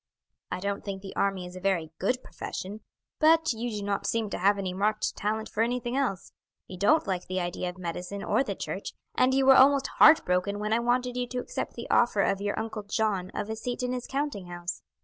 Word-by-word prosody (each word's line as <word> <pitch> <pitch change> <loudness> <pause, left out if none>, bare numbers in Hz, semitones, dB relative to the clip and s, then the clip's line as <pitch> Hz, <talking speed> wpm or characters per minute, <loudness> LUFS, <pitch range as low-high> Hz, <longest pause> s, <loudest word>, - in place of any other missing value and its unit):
I - - -3
don't 200 +1 -3
think 195 -1 -5
the 195 - -8
army 195 -2 0
is 180 +1 -10
a - - -6
very 180 -4 0
good 250 +7 0
profession, 205 +4 -6 0.4
but 320 -2 +5
you 235 +2 -3
do 210 -3 -4
not 200 -1 -1
seem 225 -3 -1
to - - -2
have 200 +3 +4
any 190 -2 -3
marked 210 +3 0
talent 215 +2 -2
for 215 - -2
anything 240 +1 0
else. 255 -9 -1 0.3
You 185 - -9
don't 305 - +4
like 185 -3 -2
the 185 0 -1
idea 175 0 -2
of 180 - -9
medicine 180 +3 -5
or - - +2
the - - -4
church, - - -5 0.2
and 255 - +3
you 270 0 +3
were 265 0 +8
almost 275 +1 +6
heart 310 - +8
broken 180 +3 0
when 210 +1 -1
I 230 - +3
wanted 245 +1 0
you 250 0 -1
to 250 - -5
accept 250 - -4
the 235 - -6
offer 235 -4 +4
of 195 0 +1
your 205 0 -2
uncle 220 -1 -4
John 200 -3 -1
of - - -2
a 220 - -3
seat 245 +2 -4
in 250 0 -1
his 250 -1 -4
counting 270 -9 -3
house. 175 +1 -5
210 Hz, 230 wpm, -28 LUFS, 190-245 Hz, 0.4 s, were